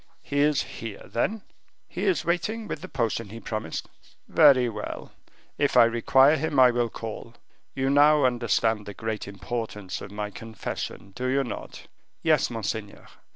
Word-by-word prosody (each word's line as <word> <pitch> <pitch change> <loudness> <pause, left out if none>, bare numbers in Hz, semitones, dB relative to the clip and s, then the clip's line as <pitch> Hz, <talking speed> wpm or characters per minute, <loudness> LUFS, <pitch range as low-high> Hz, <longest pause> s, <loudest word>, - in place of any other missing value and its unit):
"He 145 - -2
is 150 0 +3
here, 110 -3 -8
then?" 205 - -1 0.4
"He - - -4
is 380 - +1
waiting 210 +6 -1
with 155 - -5
the 185 - -7
potion 115 -4 -1
he 115 +3 -8
promised." 110 -8 -4 0.4
"Very 140 -6 +6
well; 105 -2 -6 0.5
if 145 -3 +2
I 120 - +10
require 130 +5 +4
him, 145 -1 0
I 125 -1 +8
will 120 -1 0
call; 115 +1 -7 0.4
you 135 0 0
now 145 +1 +5
understand 115 -3 +1
the 100 - -7
great 110 -2 -4
importance 100 -1 -5
of - - -8
my 105 0 -4
confession, 110 -2 -6
do 125 +6 -4
you 135 +2 +2
not?" 120 - -7 0.4
"Yes, 155 -4 +3
monseigneur." 110 -2 -5
120 Hz, 155 wpm, -26 LUFS, 110-145 Hz, 0.5 s, I